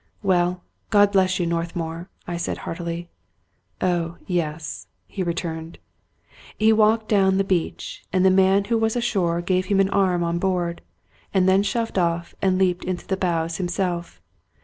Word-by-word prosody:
" - - -40
Well, 180 -2 +1 0.3
God 205 -1 +5
bless 185 -1 +2
you, 175 - +1
Northmour! 170 0 -3
" - - -36
I 175 - -3
said 170 - -2
heartily. 170 0 -5 0.4
" - - -47 0.3
Oh, 175 -2 0
yes," 160 -4 -3 0.2
he 195 - -6
returned. 165 -2 -3 0.8
He 220 +1 +4
walked 220 0 +3
down 190 -2 +3
the 195 - +3
beach; 185 -4 -2
and 185 0 +2
the 190 - +6
man 190 +1 +4
who 230 +2 0
was 225 +1 +1
ashore 190 -8 0
gave 185 +1 0
him 195 0 +2
an 195 0 +3
arm 185 -3 +2
on 170 0 -1
board, 175 -2 -1 0.5
and 185 -1 +4
then 190 +1 +5
shoved 225 -1 -1
off 170 -1 -1
and 190 -1 +2
leaped 180 -2 +1
into 185 -1 -4
the 190 - -1
bows 170 -3 -1
himself. 175 - -2
185 Hz, 170 wpm, -23 LUFS, 170-195 Hz, 0.8 s, the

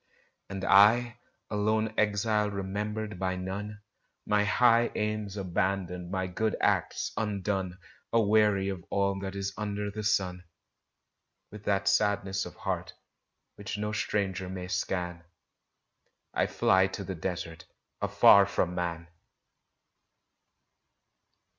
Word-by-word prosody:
And 95 -1 -4
I 120 +5 +5 0.3
a - - -2
lone 110 +1 +1
exile 105 0 +1
remembered 105 +1 -4
by 95 0 -1
none 100 +3 -5 0.4
My 105 0 +2
high 120 +3 +4
aims 105 -1 -2
abandoned, 90 -1 -2
my 95 0 -1
good 110 +4 -1
acts - - 0
undone, 100 -3 -2 0.3
Aweary 105 -3 +3
of 95 -3 -5
all 100 0 0
that 95 0 -5
is 100 0 -3
under 105 -1 -3
the 110 +1 -5
sun, 95 -4 0 1.1
With 105 0 -11
that 100 -1 +1
sadness 100 -1 +1
of - - -12
heart - - -4 0.6
which 100 +1 -5
no 105 +1 -2
stranger 95 -3 -2
may 90 -1 -6
scan, 90 -2 -2 1.1
I - - +1
fly 95 0 +3
to 100 +1 -6
the 95 - -4
desert, 85 0 -5 0.4
afar 100 -1 +6
from 90 -3 0
man! 85 -1 -3
100 Hz, 115 wpm, -29 LUFS, 95-105 Hz, 1.1 s, afar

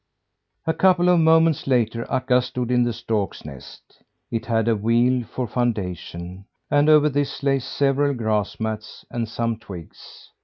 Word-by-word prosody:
A 160 - +1
couple 180 -1 +3
of 175 -1 +5
moments 160 -2 +3
later 115 -3 0
Akka 125 -1 +2
stood 125 0 -4
in 125 -1 +3
the 120 - 0
storks' 110 -6 -3
nest. 70 -4 -13 0.3
It 115 -1 -3
had 115 -1 +1
a 115 - +3
wheel 120 +4 +2
for 125 +3 -4
foundation, 95 -5 -3 0.3
and 145 +1 +4
over 150 -1 +6
this 145 -1 -2
lay 135 -1 +2
several 140 +2 0
grass 110 -3 -1
mats, 110 -1 -5
and 115 -2 -3
some 115 -1 -2
twigs. 90 -7 -12
120 Hz, 155 wpm, -22 LUFS, 110-140 Hz, 0.3 s, over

